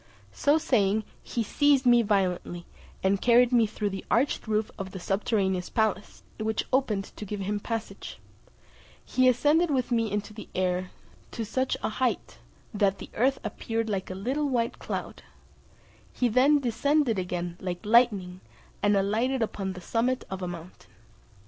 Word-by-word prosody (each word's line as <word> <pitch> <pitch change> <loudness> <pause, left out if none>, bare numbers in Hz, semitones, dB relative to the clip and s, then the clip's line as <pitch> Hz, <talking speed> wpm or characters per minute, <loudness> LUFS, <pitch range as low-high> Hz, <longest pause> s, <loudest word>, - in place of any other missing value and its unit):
So 290 +1 +3
saying, 220 -9 +2 0.2
he 235 - -2
seized 280 +4 +3
me 240 -1 +6
violently, 185 -4 -1 0.4
and 190 +1 +2
carried 245 0 +5
me 235 -3 +4
through 205 -1 -3
the 195 - -5
arched 245 +2 +1
roof 215 0 0
of 190 -1 -6
the 190 - -6
subterraneous 190 -1 0
palace, 215 -3 -1 0.2
which 220 0 -1
opened 215 -7 0
to - - -7
give 205 0 -5
him 205 +2 -1
passage; 225 +1 -5 0.9
he 255 0 +3
ascended 300 +7 +3
with 260 -4 0
me 230 -2 +1
into 210 +1 -3
the 215 - -10
air 185 0 0 0.4
to 225 - -3
such 260 +4 -1
a - - +1
height, 245 +3 -2 0.3
that 200 -2 +2
the - - -10
earth 265 +4 +2
appeared 225 -1 -3
like 190 -2 -2
a 185 - -5
little 265 +9 -1
white 235 -3 -1
cloud; - - -5 0.9
he 250 - +1
then 260 +6 +4
descended 265 -1 +1
again 175 -1 -3
like 180 +1 -5
lightning, 205 -6 +3 0.4
and 205 0 +3
alighted 225 +6 +1
upon 195 -3 -3
the 180 - -9
summit 245 +7 0
of 190 0 -4
a 180 - -2
mountain. 175 0 -9
220 Hz, 160 wpm, -27 LUFS, 195-250 Hz, 0.9 s, me